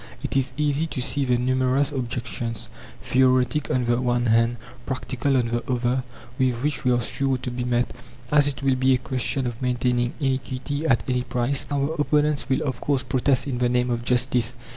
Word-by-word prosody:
It - - -3
is 135 -1 +1
easy 150 +1 +1
to 145 - -5
see 140 +2 +1
the 125 -1 +2
numerous 130 +3 +1
objections 120 -3 -4 0.3
theoretic 130 +2 +2
on 125 -1 +1
the 120 +1 +1
one 120 -1 +1
hand, 115 +1 +3 0.3
practical 130 +1 -1
on 120 -2 +1
the 120 +3 -2
other 125 +1 +1 0.4
with 130 -2 +2
which 150 0 -1
we 125 - +2
are 120 -1 +2
sure 135 +2 -1
to 125 0 -5
be 125 0 -3
met. 120 0 0 0.4
As 145 -1 +5
it 140 -1 -3
will 135 -1 +3
be 130 0 +3
a - - +2
question 130 +1 -2
of 120 0 -4
maintaining 125 -1 0
iniquity 135 +2 -2
at 120 -5 +2
any 125 -1 +1
price, 125 +2 -1
our 145 +1 0
opponents 150 -1 +1
will 130 - +1
of 130 -5 -3
course 140 -3 0
protest 130 +1 +1
"in 130 -4 -3
the 125 -1 +2
name 125 0 +1
of 120 0 -2
justice." 125 -1 +1
130 Hz, 195 wpm, -24 LUFS, 120-135 Hz, 0.4 s, As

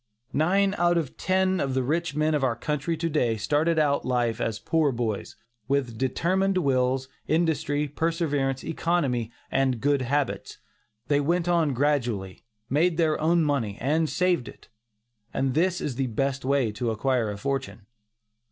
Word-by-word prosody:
Nine 195 +6 +2
out 175 0 +3
of 155 -6 -2
ten 190 0 +1
of 135 -2 -1
the 130 - +1
rich 165 +3 -1
men 155 +1 +1
of 145 -2 0
our 125 -3 +1
country 150 +6 -2
to 165 +2 -1
day, 125 -8 +1
started 150 +9 +1
out 145 -2 +2
in - - -6
life 120 -2 0
as 110 -2 -1
poor 160 +2 +1
boys, 115 -4 -3 0.3
with 135 -4 0
determined 185 - +1
wills, 130 -4 +1 0.2
industry, 155 -2 +1
perseverance, 145 -3 -1
economy 140 -9 -1 0.2
and 130 -3 +1
good 140 +2 +2
habits. 140 +3 -2 0.5
They 145 -1 +3
went 170 +4 0
on 165 -6 +2
gradually, 120 -9 -1 0.2
made 160 +6 +2
their 160 -3 +1
own 165 +1 +3
money 125 -9 -1
and 155 +5 +1
saved 180 -8 +1
it; - - -13 0.7
and 135 -1 0
this 175 +4 +1
is 130 -5 -4
the 135 -1 0
best 135 +4 -1
way 135 -4 +1
to 115 +3 -2
acquire 115 0 0
a 100 - -4
fortune. 135 -3 -3
140 Hz, 160 wpm, -26 LUFS, 125-165 Hz, 0.7 s, out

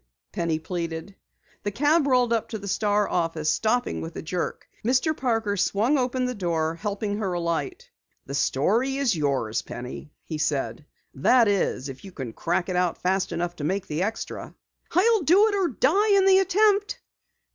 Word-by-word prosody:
Penny 165 -2 -1
pleaded. 165 +2 -5 0.5
The 205 - -2
cab 290 +7 +2
rolled 250 -3 +3
up 225 - -1
to 220 - -4
the 200 -1 -8
Star 205 +1 +1
office, 165 -3 0
stopping 245 +3 0
with 165 0 -7
a - - -6
jerk. 175 +2 -4 0.2
Mr. 260 +7 +2
Parker 225 -6 0
swung 220 +8 +2
open 255 0 0
the 250 - -2
door, 165 -6 -1
helping 205 +3 -3
her 195 -4 -1
alight. 175 - -2 0.4
"The 140 - -7
story 220 - +1
is 265 -8 +1
yours, 135 -7 0
Penny," 125 +4 -8
he 155 -2 -5
said. 140 -3 -2 0.3
"That 230 - +4
is, 190 -9 0
if 135 -1 -9
you 195 - -10
can 130 -9 -6
crack 175 +6 -1
it 185 - -2
out 180 -1 +1
fast 190 +1 +1
enough 175 +1 -3
to 145 - -6
make 190 +5 -1
the 155 +2 -3
extra." 220 +4 -4 0.4
"I'll 430 +5 +4
do 370 +7 +5
it - - -3
or 390 -3 +2
die 385 - +2
in 385 - +4
the 385 0 +6
attempt." 405 +2 +2
200 Hz, 180 wpm, -25 LUFS, 165-260 Hz, 0.5 s, the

